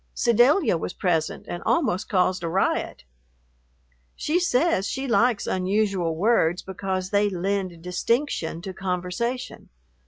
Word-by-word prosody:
Sedalia 240 Hz, -, +3 dB
was 180 Hz, -, -4 dB
present 165 Hz, -5 st, -1 dB
and 175 Hz, -, -5 dB
almost 235 Hz, -, 0 dB
caused 185 Hz, -1 st, +1 dB
a 170 Hz, -, -3 dB
riot. 185 Hz, -, -1 dB, 1.1 s
She 325 Hz, +4 st, 0 dB
says 290 Hz, -, +1 dB
she 270 Hz, +3 st, -3 dB
likes 240 Hz, -2 st, +2 dB
unusual 190 Hz, -3 st, 0 dB
words 180 Hz, -2 st, +2 dB
because 190 Hz, -1 st, -4 dB
they 205 Hz, 0 st, +3 dB
lend 185 Hz, -2 st, -3 dB
distinction 180 Hz, -, -1 dB
to 190 Hz, -1 st, -6 dB
conversation. 190 Hz, +7 st, -3 dB
190 Hz, 120 wpm, -24 LUFS, 180-235 Hz, 1.1 s, Sedalia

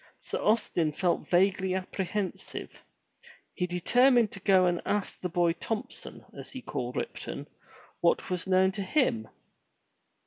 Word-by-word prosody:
Sir -, -, -4 dB
Austin 180 Hz, -8 st, +2 dB
felt 175 Hz, +3 st, 0 dB
vaguely 190 Hz, +1 st, +3 dB
apprehensive. 190 Hz, +1 st, -4 dB, 0.7 s
He 180 Hz, -, -1 dB
determined 240 Hz, +6 st, +4 dB
to 195 Hz, -, -8 dB
go 190 Hz, -1 st, +4 dB
and 175 Hz, -1 st, +1 dB
ask 205 Hz, -1 st, -2 dB
the 180 Hz, -, -2 dB
boy 170 Hz, 0 st, +2 dB
Thompson, 215 Hz, +5 st, -5 dB
as -, -, -9 dB
he 260 Hz, -, -8 dB
called 125 Hz, 0 st, -4 dB
Ripton, -, -, -5 dB, 0.5 s
what 170 Hz, +2 st, +1 dB
was 180 Hz, +1 st, -1 dB
known 190 Hz, 0 st, +4 dB
to 200 Hz, +1 st, -5 dB
him. 185 Hz, -, +1 dB
185 Hz, 135 wpm, -29 LUFS, 175-205 Hz, 0.7 s, determined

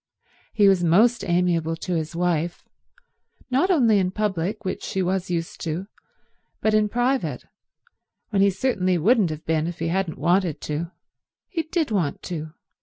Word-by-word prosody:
He 205 Hz, -3 st, +4 dB
was 190 Hz, -2 st, +4 dB
most 215 Hz, +7 st, +4 dB
amiable 170 Hz, -2 st, +1 dB
to 180 Hz, +2 st, -4 dB
his 160 Hz, 0 st, -2 dB
wife—not 180 Hz, -, -3 dB
only 235 Hz, -, +4 dB
in 185 Hz, -1 st, +1 dB
public, 205 Hz, +1 st, -2 dB
which 185 Hz, -, -3 dB
she 190 Hz, -, -2 dB
was 185 Hz, +1 st, -1 dB
used 165 Hz, -2 st, -3 dB
to, 165 Hz, +4 st, -3 dB, 0.7 s
but 215 Hz, -, +1 dB
in 215 Hz, -1 st, +3 dB
private, 250 Hz, +4 st, -1 dB, 0.9 s
when 200 Hz, -2 st, +2 dB
he 200 Hz, -, +5 dB
certainly 190 Hz, -3 st, 0 dB
wouldn't 205 Hz, +2 st, +3 dB
have 155 Hz, 0 st, -6 dB
been 160 Hz, 0 st, 0 dB
if 175 Hz, 0 st, -5 dB
he 165 Hz, 0 st, -2 dB
hadn't 180 Hz, -2 st, -1 dB
wanted 175 Hz, +1 st, +1 dB
to. 155 Hz, +3 st, -3 dB, 0.6 s
He 345 Hz, -4 st, -1 dB
did 320 Hz, -4 st, -2 dB
want 170 Hz, -9 st, -1 dB
to. 155 Hz, -3 st, -5 dB
185 Hz, 155 wpm, -24 LUFS, 165-215 Hz, 0.9 s, he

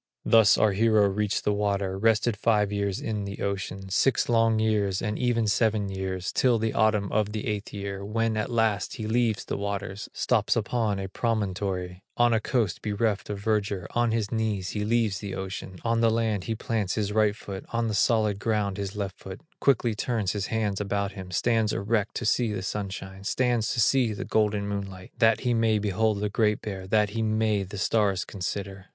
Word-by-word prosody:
Thus 110 Hz, -2 st, +6 dB
our 110 Hz, -, +4 dB
hero 105 Hz, 0 st, +4 dB
reached 105 Hz, +1 st, -1 dB
the 105 Hz, -, +1 dB
water, 100 Hz, -2 st, -1 dB
Rested 110 Hz, +2 st, +2 dB
five 105 Hz, -1 st, +2 dB
years 100 Hz, -2 st, -1 dB
in 105 Hz, -2 st, -3 dB
the 100 Hz, 0 st, -6 dB
ocean, 95 Hz, -1 st, -3 dB
Six 130 Hz, +7 st, +2 dB
long 115 Hz, -1 st, +3 dB
years, 105 Hz, -3 st, +1 dB
and 105 Hz, -1 st, -2 dB
even 120 Hz, -2 st, +1 dB
seven 105 Hz, 0 st, +1 dB
years, 95 Hz, -1 st, -3 dB
Till 125 Hz, -3 st, +3 dB
the 110 Hz, 0 st, -1 dB
autumn 110 Hz, -3 st, +2 dB
of 105 Hz, -1 st, 0 dB
the 110 Hz, -, -3 dB
eighth 105 Hz, -1 st, -3 dB
year, 100 Hz, -1 st, -5 dB
When 110 Hz, +2 st, 0 dB
at 110 Hz, +2 st, -1 dB
last 110 Hz, -3 st, 0 dB
he 110 Hz, -, -5 dB
leaves 115 Hz, 0 st, +1 dB
the -, -, -3 dB
waters, 100 Hz, -1 st, -4 dB
Stops -, -, +1 dB
upon 110 Hz, -5 st, 0 dB
a 95 Hz, 0 st, -4 dB
promontory, 95 Hz, -4 st, -2 dB, 0.2 s
On 120 Hz, -1 st, +4 dB
a 110 Hz, -, +3 dB
coast 110 Hz, -5 st, -1 dB
bereft 105 Hz, -1 st, -1 dB
of 105 Hz, -, -3 dB
verdure; 100 Hz, -3 st, 0 dB
On 120 Hz, 0 st, +1 dB
his 110 Hz, -3 st, -1 dB
knees 105 Hz, -4 st, -1 dB
he 105 Hz, -, -2 dB
leaves 110 Hz, -2 st, +1 dB
the 100 Hz, -2 st, -5 dB
ocean, 95 Hz, -1 st, -6 dB
On 115 Hz, 0 st, +1 dB
the 115 Hz, -, +5 dB
land 110 Hz, -4 st, 0 dB
he 115 Hz, -, -2 dB
plants 110 Hz, -4 st, -2 dB
his 105 Hz, -2 st, -1 dB
right 105 Hz, -1 st, +3 dB
foot, 100 Hz, -3 st, -7 dB
On 115 Hz, 0 st, 0 dB
the 110 Hz, -, -2 dB
solid 110 Hz, -2 st, +2 dB
ground 105 Hz, -3 st, 0 dB
his 100 Hz, 0 st, -4 dB
left 100 Hz, -2 st, -4 dB
foot, 95 Hz, +4 st, -9 dB, 0.2 s
Quickly 120 Hz, -4 st, +2 dB
turns 105 Hz, -3 st, -1 dB
his 105 Hz, -1 st, -3 dB
hands 105 Hz, -3 st, -1 dB
about 100 Hz, 0 st, -1 dB
him, 95 Hz, -2 st, -9 dB
Stands 110 Hz, +3 st, +1 dB
erect 105 Hz, +1 st, -1 dB
to -, -, -3 dB
see 115 Hz, +1 st, +2 dB
the 95 Hz, -3 st, -3 dB
sunshine, 95 Hz, -1 st, -5 dB
Stands 120 Hz, 0 st, +1 dB
to -, -, -2 dB
see 120 Hz, -1 st, +3 dB
the 100 Hz, -, -5 dB
golden 105 Hz, -2 st, +1 dB
moonlight, 100 Hz, -2 st, -5 dB
That 115 Hz, -1 st, +4 dB
he 125 Hz, -2 st, +1 dB
may 115 Hz, -2 st, +2 dB
behold 105 Hz, +1 st, 0 dB
the 105 Hz, -, 0 dB
Great 105 Hz, 0 st, +1 dB
Bear, 95 Hz, -3 st, -5 dB
That 105 Hz, 0 st, +2 dB
he 115 Hz, -, -2 dB
may 110 Hz, -1 st, +1 dB
the 95 Hz, +2 st, -6 dB
stars 100 Hz, -2 st, +1 dB
consider. 95 Hz, 0 st, -5 dB
105 Hz, 200 wpm, -26 LUFS, 100-110 Hz, 0.2 s, Thus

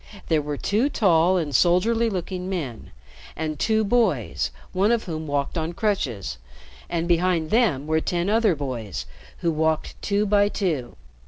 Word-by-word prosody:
There 160 Hz, -2 st, +3 dB
were 145 Hz, 0 st, -4 dB
two 220 Hz, -, +1 dB
tall 185 Hz, -, +3 dB
and 150 Hz, -6 st, -2 dB
soldierly 225 Hz, -, +3 dB
looking 185 Hz, -1 st, -4 dB
men 145 Hz, -, -4 dB, 0.5 s
and 155 Hz, -2 st, -3 dB
two 220 Hz, -1 st, +2 dB
boys, 160 Hz, -, +1 dB, 0.2 s
one 195 Hz, +4 st, +3 dB
of 235 Hz, -1 st, +1 dB
whom 160 Hz, -3 st, -5 dB
walked 145 Hz, +3 st, -1 dB
on 160 Hz, +2 st, -3 dB
crutches, 130 Hz, -, -2 dB, 0.5 s
and 170 Hz, 0 st, -1 dB
behind 170 Hz, -2 st, +1 dB
them 210 Hz, -, +2 dB
were 160 Hz, +1 st, +1 dB
ten 175 Hz, +2 st, -1 dB
other 215 Hz, -3 st, +3 dB
boys 125 Hz, -, -4 dB, 0.4 s
who 170 Hz, -, +1 dB
walked 160 Hz, 0 st, -1 dB
two 205 Hz, +1 st, +1 dB
by 205 Hz, 0 st, +3 dB
two. 160 Hz, -, -2 dB
170 Hz, 155 wpm, -24 LUFS, 150-205 Hz, 0.5 s, There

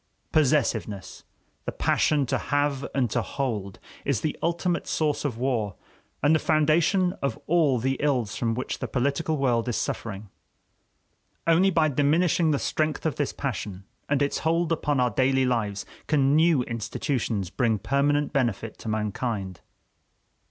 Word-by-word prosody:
Possessiveness 125 Hz, -9 st, 0 dB, 0.4 s
the -, -, -2 dB
passion 145 Hz, -3 st, +2 dB
to -, -, -1 dB
have 145 Hz, -1 st, 0 dB
and 130 Hz, -3 st, +2 dB
to -, -, +1 dB
hold 105 Hz, -8 st, -3 dB, 0.3 s
is 135 Hz, -7 st, 0 dB
the 155 Hz, -, -1 dB
ultimate 170 Hz, +1 st, 0 dB
source 150 Hz, -2 st, 0 dB
of 135 Hz, -6 st, -2 dB
war, 115 Hz, -6 st, -1 dB, 0.5 s
and 145 Hz, +2 st, +5 dB
the 160 Hz, -, +4 dB
foundation 165 Hz, +5 st, +3 dB
of 140 Hz, -, -1 dB
all 155 Hz, -6 st, +3 dB
the 135 Hz, +3 st, 0 dB
ills 130 Hz, -8 st, 0 dB
from 115 Hz, -2 st, -1 dB
which 130 Hz, -, -4 dB
the -, -, -3 dB
political 140 Hz, +5 st, 0 dB
world 125 Hz, -4 st, +1 dB
is 120 Hz, -, -1 dB
suffering. 105 Hz, -2 st, -4 dB, 1.2 s
Only 165 Hz, +4 st, +4 dB
by 165 Hz, -4 st, +3 dB
diminishing 155 Hz, +4 st, +2 dB
the 145 Hz, -, +2 dB
strength 155 Hz, +3 st, -1 dB
of 160 Hz, -, 0 dB
this 145 Hz, -, 0 dB
passion 105 Hz, -8 st, -4 dB, 0.3 s
and 145 Hz, 0 st, +2 dB
its 140 Hz, -, -1 dB
hold 165 Hz, +1 st, +1 dB
upon 150 Hz, -4 st, +1 dB
our 125 Hz, -1 st, +2 dB
daily 130 Hz, +2 st, +2 dB
lives 105 Hz, -5 st, -1 dB, 0.2 s
can 140 Hz, -2 st, +3 dB
new 160 Hz, -4 st, +4 dB
institutions 115 Hz, -, -2 dB
bring 115 Hz, -4 st, +1 dB
permanent 145 Hz, +5 st, +1 dB
benefit 115 Hz, -5 st, -1 dB
to -, -, -9 dB
mankind. 105 Hz, -3 st, -3 dB
140 Hz, 150 wpm, -26 LUFS, 115-155 Hz, 1.2 s, and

